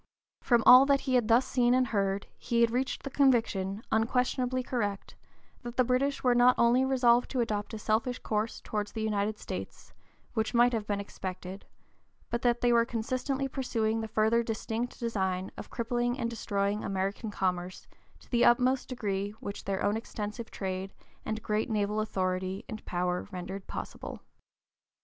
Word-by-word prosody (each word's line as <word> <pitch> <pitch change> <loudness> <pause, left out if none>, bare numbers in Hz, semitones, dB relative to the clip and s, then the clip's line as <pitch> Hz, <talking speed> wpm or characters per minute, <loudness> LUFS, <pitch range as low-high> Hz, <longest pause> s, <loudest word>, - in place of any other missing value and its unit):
From 240 -3 +3
all 255 +2 +9
that 280 -1 +3
he 265 - -2
had 245 -4 +3
thus 240 +3 +4
seen 245 -1 +2
and 255 0 +3
heard 200 -3 -1
he 235 -1 0
had 230 -1 +4
reached 255 +2 -1
the 275 - -5
conviction, 225 -7 +2
unquestionably 250 +2 +1
correct, 205 -6 -3 0.5
that 240 -2 -8
the 255 - +5
British 255 +3 0
were 250 -1 +4
not 245 +1 +5
only 240 +2 +4
resolved 250 -2 +3
to 260 - -2
adopt 215 -2 -1
a - - -4
selfish 225 +4 0
course 215 +1 -2
towards 210 -1 -3
the 220 - -3
United 210 0 0
States, - - -7 0.4
which 220 +1 -1
might 240 +1 +5
have 215 -2 -2
been 205 -1 -1
expected, 190 -1 -7 0.6
but 235 - -1
that 240 -1 +2
they 245 -1 +4
were 235 0 +5
consistently 255 +4 -2
pursuing 225 -5 -1
the 220 - -4
further 220 +2 +2
distinct 230 +1 -3
design 190 -5 -1
of - - -9
crippling 240 +1 -1
and 235 -2 -2
destroying 205 -2 -1
American 195 +3 -2
commerce, 185 -2 -2 0.4
to - - -20
the 240 -1 +3
utmost 255 +2 +3
degree 205 -4 -3
which 200 - -7
their 195 -1 -2
own 205 - +2
extensive 220 0 -5
trade 190 0 -4 0.3
and 220 0 -3
great 215 +2 -1
naval 210 -1 0
authority 185 -1 -2
and 215 - -7
power 180 +1 -1
rendered 190 +1 -6
possible. - - -6
225 Hz, 170 wpm, -30 LUFS, 200-245 Hz, 0.6 s, all